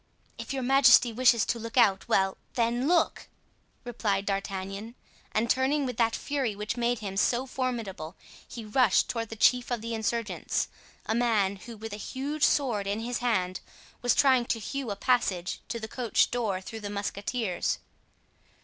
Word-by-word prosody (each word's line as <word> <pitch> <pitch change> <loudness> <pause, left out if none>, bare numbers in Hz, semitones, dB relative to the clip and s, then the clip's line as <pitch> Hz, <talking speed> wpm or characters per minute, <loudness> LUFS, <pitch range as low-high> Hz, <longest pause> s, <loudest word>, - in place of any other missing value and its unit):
"If - - -6
your 270 -1 -2
majesty 245 -3 +6
wishes 235 -1 +4
to 235 - -1
look 230 +2 -7
out—well, 195 -3 +3 0.2
then, 240 +2 +1
look!" 345 -1 +1 0.6
replied 215 -5 -1
D'Artagnan. 195 +3 -4 0.4
And 220 +2 +1
turning 265 +4 +2
with 250 -3 -4
that 230 -1 +2
fury 270 -7 -2
which 210 +2 -3
made 240 0 0
him 195 -1 -4
so 240 +5 +1
formidable, 230 -10 -4 0.3
he 230 -2 -8
rushed 215 -1 +3
toward 230 -2 -3
the 225 - -6
chief 245 +3 +3
of 240 -3 -2
the 230 +1 -4
insurgents, 225 0 -2 0.4
a - - 0
man 220 -5 +1
who, 230 +3 -10
with 220 0 -7
a - - -5
huge 275 +7 -5
sword 230 -9 +2
in 205 +2 -1
his 245 +1 -3
hand, 185 -7 0 0.4
was 245 - +3
trying 260 -3 +4
to 235 - 0
hew 265 +3 -4
a 200 - -2
passage 195 -6 0
to 230 - -4
the 220 - -5
coach 235 -1 +1
door 215 -6 -1
through 225 +4 -8
the 205 -1 -6
musketeers. 205 0 -2
230 Hz, 165 wpm, -28 LUFS, 205-245 Hz, 0.6 s, majesty